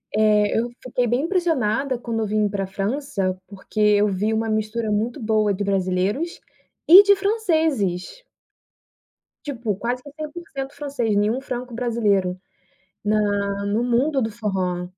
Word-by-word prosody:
eh, 210 Hz, -1 st, +3 dB
eu 240 Hz, -, -1 dB
fiquei 250 Hz, -1 st, -1 dB
bem 245 Hz, +4 st, +1 dB
impressionada 275 Hz, -, 0 dB
quando 230 Hz, -2 st, -3 dB
eu -, -, 0 dB
vim 210 Hz, 0 st, +1 dB
pra 195 Hz, -1 st, -2 dB
França, 195 Hz, -2 st, -2 dB
porque 200 Hz, +2 st, -8 dB
eu 210 Hz, 0 st, +4 dB
vi 205 Hz, +3 st, 0 dB
uma 225 Hz, 0 st, -1 dB
mistura 215 Hz, +1 st, -1 dB
muito 220 Hz, +3 st, -1 dB
boa 215 Hz, -2 st, +2 dB
de 200 Hz, +2 st, -3 dB
brasileiros 195 Hz, -, -1 dB, 0.5 s
e 375 Hz, +5 st, +10 dB
de 400 Hz, 0 st, +5 dB
franceses. 325 Hz, -, 0 dB, 1.2 s
Tipo, 235 Hz, -8 st, -3 dB
quase 245 Hz, +3 st, -3 dB
que 285 Hz, -, -11 dB
100% 305 Hz, -3 st, -6 dB
francês, 275 Hz, -7 st, -2 dB
nenhum 215 Hz, +5 st, +1 dB
franco-brasileiro, 235 Hz, -7 st, -1 dB, 0.6 s
na 205 Hz, -1 st, 0 dB
no 210 Hz, +4 st, 0 dB
mundo 260 Hz, +4 st, +1 dB
do 220 Hz, -, -1 dB
forró. 185 Hz, -5 st, -2 dB
220 Hz, 135 wpm, -22 LUFS, 205-270 Hz, 1.2 s, e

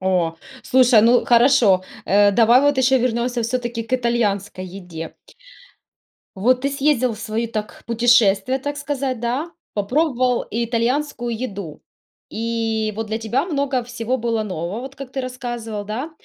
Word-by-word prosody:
О. 180 Hz, -3 st, +1 dB, 0.3 s
Слушай, 250 Hz, -3 st, +5 dB
ну 240 Hz, +2 st, +4 dB
хорошо, 235 Hz, -6 st, +4 dB, 0.2 s
э, 205 Hz, +1 st, +4 dB
давай 235 Hz, +4 st, +5 dB
вот 285 Hz, -1 st, +2 dB
ещё 260 Hz, 0 st, +4 dB
вернемся 240 Hz, 0 st, 0 dB
всё-таки 240 Hz, 0 st, -2 dB
к 230 Hz, -, -12 dB
итальянской 210 Hz, -6 st, -1 dB
еде. 165 Hz, -4 st, -7 dB, 1.3 s
Вот 245 Hz, +6 st, +2 dB
ты 280 Hz, -, +1 dB
съездил 275 Hz, -4 st, +1 dB
в -, -, -12 dB
свои, 220 Hz, +2 st, -2 dB
так, 215 Hz, -2 st, -6 dB
путешествия, 235 Hz, +1 st, +3 dB
так 290 Hz, +2 st, -4 dB
сказать, 275 Hz, -4 st, -3 dB
да. 255 Hz, +8 st, -2 dB, 0.2 s
Попробовал 250 Hz, +3 st, +1 dB
итальянскую 235 Hz, +3 st, -1 dB
еду, 200 Hz, -11 st, -6 dB, 0.5 s
и 225 Hz, -1 st, -2 dB
вот 225 Hz, 0 st, -3 dB
для 220 Hz, +1 st, -2 dB
тебя 235 Hz, +7 st, -1 dB
много 280 Hz, -6 st, -1 dB
всего 240 Hz, +1 st, -2 dB
было 230 Hz, -2 st, -1 dB
нового, 185 Hz, +2 st, -4 dB
вот 270 Hz, +1 st, -9 dB
как 270 Hz, -2 st, -9 dB
ты 270 Hz, -, -2 dB
рассказывал, 240 Hz, -4 st, -5 dB
да. 245 Hz, +10 st, -4 dB
235 Hz, 145 wpm, -21 LUFS, 215-255 Hz, 1.3 s, Слушай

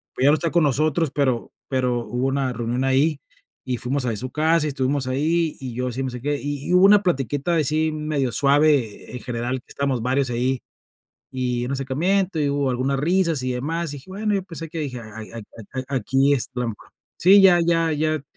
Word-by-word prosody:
pues 130 Hz, -, +1 dB
ya 145 Hz, -, +7 dB
no -, -, +4 dB
está 165 Hz, +2 st, -1 dB
con 170 Hz, -2 st, +3 dB
nosotros, 150 Hz, +2 st, +1 dB
pero, 130 Hz, -4 st, 0 dB, 0.2 s
pero 125 Hz, -3 st, 0 dB
hubo 125 Hz, +1 st, -2 dB
una 135 Hz, -1 st, 0 dB
reunión 120 Hz, +2 st, -2 dB
ahí 140 Hz, +3 st, +2 dB, 0.5 s
y 125 Hz, -1 st, -1 dB
fuimos 130 Hz, +3 st, -1 dB
ahí 120 Hz, -, 0 dB
a -, -, -5 dB
su 130 Hz, +4 st, -4 dB
casa 160 Hz, 0 st, +2 dB
y -, -, -1 dB
estuvimos 135 Hz, 0 st, -1 dB
ahí 155 Hz, +5 st, 0 dB
y 130 Hz, -3 st, -6 dB
yo 125 Hz, +1 st, -2 dB
si 130 Hz, +3 st, -3 dB
me -, -, -2 dB
acerqué, 135 Hz, +4 st, -2 dB
y 145 Hz, -1 st, -4 dB
y -, -, +1 dB
hubo 180 Hz, +1 st, +6 dB
una 205 Hz, 0 st, +6 dB
platiquita 145 Hz, -, 0 dB
así 155 Hz, +1 st, +1 dB
medio 150 Hz, -4 st, -2 dB
suave 140 Hz, -4 st, +2 dB
eh, -, -, -5 dB
en -, -, -5 dB
general 125 Hz, +1 st, -2 dB
que -, -, -53 dB
estábamos 140 Hz, -4 st, -1 dB
varios 130 Hz, +1 st, +1 dB
ahí, 125 Hz, +2 st, 0 dB, 0.7 s
y 125 Hz, -2 st, -2 dB
un 130 Hz, -, -3 dB
acercamiento, 165 Hz, +8 st, 0 dB
y 145 Hz, -, +1 dB
hubo 140 Hz, -1 st, 0 dB
algunas 130 Hz, +2 st, -1 dB
risas 165 Hz, -1 st, +1 dB
y 130 Hz, 0 st, -1 dB
demás, 155 Hz, +5 st, -2 dB
y -, -, -6 dB
dije: 135 Hz, -, -17 dB
"Bueno". 210 Hz, +2 st, -1 dB
Yo 195 Hz, -, 0 dB
pensé 165 Hz, -2 st, -7 dB
que 165 Hz, -, -6 dB
dije: 130 Hz, -5 st, -4 dB
"Ay 110 Hz, -1 st, -9 dB
a -, -, -7 dB
a 115 Hz, +4 st, -8 dB
aquí 135 Hz, +4 st, +2 dB
es 130 Hz, -, 0 dB
trampa". 125 Hz, -4 st, -5 dB, 0.3 s
Sí, 195 Hz, +3 st, +7 dB
ya 180 Hz, -2 st, +6 dB
ya 165 Hz, -1 st, +2 dB
ya, 155 Hz, 0 st, 0 dB
140 Hz, 220 wpm, -22 LUFS, 125-155 Hz, 0.7 s, ya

